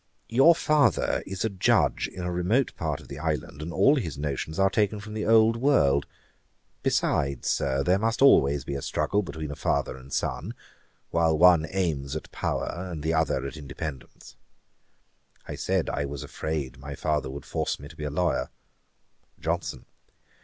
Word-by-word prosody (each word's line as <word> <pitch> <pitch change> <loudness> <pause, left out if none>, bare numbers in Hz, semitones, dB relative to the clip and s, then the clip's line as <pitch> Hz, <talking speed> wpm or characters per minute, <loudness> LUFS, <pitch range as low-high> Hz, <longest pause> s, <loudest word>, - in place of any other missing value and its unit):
Your 135 +9 +6
father 150 -2 +2
is 95 +2 -3
a - - +1
Judge 95 -3 +2
in 90 - -8
a 90 - -2
remote 95 +9 +1
part 75 -4 -3
of - - -15
the 70 +1 -8
island, 75 -2 -3
and 80 +3 -5
all 115 - +4
his 80 - -3
notions 75 +2 -3
are 95 0 +3
taken 105 +1 +1
from 105 +1 -9
the 110 -1 -3
old 115 0 +5
world. 115 - +3 0.7
Besides, 70 -1 0
Sir, 70 0 +1
there 90 +6 +3
must 115 +1 0
always 70 - +5
be - - -4
a 70 - -3
struggle 100 +8 0
between 80 -5 -6
a - - -5
father - - -1
and 65 +1 -13
son, - - -2 0.6
while 80 -2 +2
one 85 -2 +6
aims 80 -7 -1
at 80 - -6
power 90 +2 -3
and 80 -4 -6
the 80 +1 0
other 80 -4 +1
at 70 +1 -6
independence.' 70 -1 -8 1.1
I - - -5
said, - - -1
I 70 - -1
was 70 -1 -6
afraid 70 -5 -4
my 70 +1 -7
father 75 -4 -1
would 70 +1 -8
force - - -2
me 70 - -9
to 80 - -14
be 75 - -6
a - - -1
lawyer. 85 +5 0 0.9
JOHNSON. 80 -6 -3
80 Hz, 175 wpm, -26 LUFS, 70-95 Hz, 1.1 s, Your